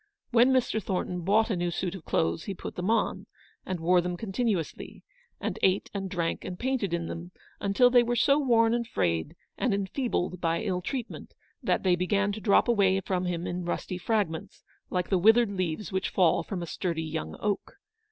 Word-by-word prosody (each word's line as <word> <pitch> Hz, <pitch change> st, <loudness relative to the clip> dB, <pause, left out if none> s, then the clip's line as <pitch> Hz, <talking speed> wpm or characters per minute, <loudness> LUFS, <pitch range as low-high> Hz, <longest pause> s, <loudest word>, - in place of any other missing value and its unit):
When 240 Hz, +2 st, +5 dB
Mr. 250 Hz, -4 st, +1 dB
Thornton 180 Hz, -1 st, -2 dB
bought 215 Hz, +6 st, +3 dB
a -, -, +1 dB
new 175 Hz, 0 st, -1 dB
suit 175 Hz, +1 st, -2 dB
of 185 Hz, -5 st, -9 dB
clothes 80 Hz, +1 st, 0 dB
he 195 Hz, -, -4 dB
put -, -, -7 dB
them 180 Hz, +3 st, -2 dB
on, 230 Hz, -, 0 dB, 0.4 s
and 185 Hz, -2 st, -2 dB
wore 175 Hz, +2 st, +4 dB
them 175 Hz, 0 st, -3 dB
con 205 Hz, +1 st, -6 dB
tinuously; 205 Hz, -, -2 dB, 0.4 s
and -, -, -3 dB
ate 190 Hz, +1 st, +2 dB
and 195 Hz, -1 st, -3 dB
drank 170 Hz, -3 st, -2 dB
and 180 Hz, -1 st, -6 dB
painted 250 Hz, -6 st, -1 dB
in 170 Hz, -1 st, -1 dB
them 170 Hz, +1 st, -6 dB, 0.3 s
until 205 Hz, +5 st, +4 dB
they 245 Hz, -1 st, +7 dB
were 240 Hz, 0 st, 0 dB
so 280 Hz, +4 st, +4 dB
worn 230 Hz, -5 st, +3 dB
and 235 Hz, -1 st, -1 dB
frayed, 85 Hz, -, -1 dB, 0.2 s
and 245 Hz, -6 st, +2 dB
enfeebled 195 Hz, -3 st, -2 dB
by 165 Hz, -1 st, 0 dB
ill 185 Hz, -4 st, -1 dB
treatment, 245 Hz, +5 st, -5 dB, 0.3 s
that -, -, 0 dB
they 185 Hz, -2 st, +4 dB
began 200 Hz, +3 st, +1 dB
to 215 Hz, +1 st, -6 dB
drop 200 Hz, -2 st, +4 dB
away 195 Hz, -5 st, +3 dB
from 185 Hz, -1 st, -1 dB
him 175 Hz, -1 st, -2 dB
in 180 Hz, +1 st, -3 dB
rusty 180 Hz, +1 st, -3 dB
fragments 190 Hz, -6 st, -2 dB, 0.3 s
like 180 Hz, -1 st, -1 dB
the 190 Hz, -, +3 dB
withered 225 Hz, +3 st, +5 dB
leaves 185 Hz, 0 st, -3 dB
which 190 Hz, 0 st, -1 dB
fall 180 Hz, -2 st, +3 dB
from 185 Hz, -4 st, -5 dB
a -, -, -3 dB
sturdy 165 Hz, -1 st, -2 dB
young 160 Hz, 0 st, -4 dB
oak. 205 Hz, -2 st, -2 dB
190 Hz, 200 wpm, -28 LUFS, 175-220 Hz, 0.4 s, they